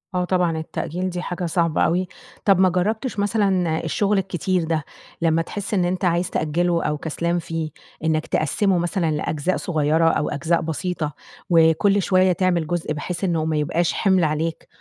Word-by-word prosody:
آه 180 0 +1
طبعًا 180 -3 +1
التأجيل 175 +3 -3
دي 180 -1 -4
حاجة 180 0 -4
صعبة 170 -1 +1
أوي. 180 +2 +2 0.4
طَب 195 -3 +5
ما 185 0 +5
جرّبتش 210 +6 -1
مثلًا، 195 -6 +1
الشغل 200 +5 +1
الكتير 185 -1 0
ده 160 -1 -1 0.4
لما 165 0 +3
تحس 205 +5 -5
إن 185 -3 +2
أنت 180 +1 -1
عايز 175 +1 +1
تأجّله 170 +2 0
أو 150 0 -1
كسلان 170 +3 -2
فيه، 165 -1 -4 0.3
إنك 160 -1 0
تقسّمه 185 +5 +1
مثلًا 175 -1 0
لأجزاء 155 +3 -1
صغيّرة 160 0 +2
أو 150 - 0
أجزاء 165 +4 0
بسيطة، 160 -1 -3 0.4
وكلّ 170 +4 +4
شوية 185 +1 +3
تعمل 175 -3 +1
جزء، 170 -2 -2
بحيث 170 +5 -5
إنه 165 -4 +1
ما 160 -1 0
يبقاش 165 +3 0
حِمل 190 -3 +2
عليك 160 +1 -1
175 Hz, 165 wpm, -22 LUFS, 160-185 Hz, 0.4 s, طَب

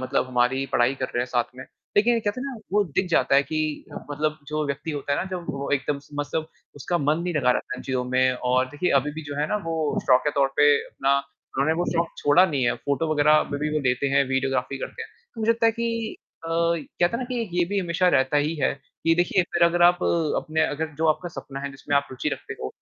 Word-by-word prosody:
मतलब 130 0 0
हमारी 130 +2 +1
पढ़ाई 120 +2 +3
कर - - +1
रहे 120 - +1
हैं - - -4
साथ 120 -1 +1
में, 130 - -8 0.3
लेकिन 235 +4 +5
ये 230 - +1
कहते 205 +3 -2
ना 275 0 -4 0.2
वो 205 0 +3
दिख 180 +2 -1
जाता 165 - +3
है 140 - +6
कि 155 0 -3 0.3
मतलब 155 +1 -1
जो 150 0 -1
व्यक्ति 140 +3 -3
होता 145 -1 -3
है - - +1
ना - - -1
जब 180 -2 -5
वो 140 0 -5
एकदम 140 +1 -1
स - - -21
मसब 145 +2 -2 0.3
उसका 175 +5 -1
मन 150 +1 +1
नहीं 175 -1 -2
लगा 130 -4 +3
रहता 125 - -1
है - - -8
इन - - -8
चीज़ों 130 -2 -2
में 130 +1 +2 0.2
और 130 0 +4
देखिए 175 +4 0
अभी 150 +3 -4
भी 160 +2 -7
जो 145 -1 -6
है 150 - +1
ना 210 - +1
वो 165 0 -2 0.3
शौक 125 0 +6
के 150 - +2
तौर 140 -2 +2
पे 145 0 +6
अपना 135 +1 +1 0.4
उन्होंने 140 +4 +2
वो 175 - +1
शौक 170 0 +1
छोड़ा 155 +6 +5
नहीं 145 -7 -1
है, 120 - +2
फोटो 155 +3 -1
वगैरह 150 0 +4
अभी 145 -1 +1
भी 150 +1 -1
वो - - +2
लेते 125 +2 +1
हैं, 140 0 +3
वीडियोग्राफी 135 0 0
करते 460 - -6
हैं। 445 - -9 0.3
मुझे 220 +1 +2
लगता 230 0 +3
है 225 - +4
कि 230 -1 -3 0.3
अ, - - -5
कहते 170 0 +1
है - - -5
ना 255 - -3
कि 250 -2 -2
एक 225 - -5
ये 175 0 +2
भी 200 +1 0
हमेशा 180 0 +1
रहता 135 -2 +2
ही 150 +3 +1
है 140 - +1 0.3
कि 165 - +4
देखिए 175 +2 +2
फिर 170 - +1
अगर 170 +1 +3
आप 175 +1 +5 0.3
अपने 160 0 0
अगर 160 +1 -2
जो 160 - +2
आपका 165 +3 +1
सपना 140 -4 -8
है 140 0 -4
जिसमें 135 +1 -4
आप 140 - +1
रुचि 130 - -2
रखते - - -5
हो, 65 - -3
150 Hz, 260 wpm, -24 LUFS, 135-175 Hz, 0.4 s, है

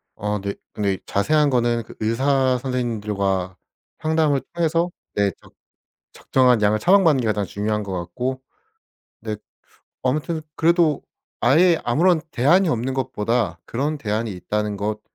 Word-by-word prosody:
어 105 0 -2
네. 100 +1 -3 0.2
근데 100 -2 0
이 95 - -6
자세한 150 +8 +2
거는 120 -2 +1
그 - - -14
의사 130 +3 +2
선생님들과 105 -7 -2 0.4
상담을 155 -3 +1
통해서 170 +1 +1 0.2
네 100 -1 +2
적 - - -19 0.6
적정한 125 -4 +2
양을 105 +1 +3
처방받는 175 - +4
게 - - -2
가장 105 -1 0
중요한 105 +3 -2
것 100 - -6
같고 120 +10 -3 0.8
네 110 -1 -3 0.7
아무튼 155 +5 -1
그래도 165 -3 +3 0.4
아예 170 0 +4
아무런 160 +8 +3
대안이 170 +10 +3
없는 130 -2 -1
것보다 120 -5 -1
그런 145 +6 -2
대안이 110 -2 -2
있다는 105 +3 -3
것 105 +2 -3
120 Hz, 290 characters per minute, -22 LUFS, 105-150 Hz, 0.8 s, 처방받는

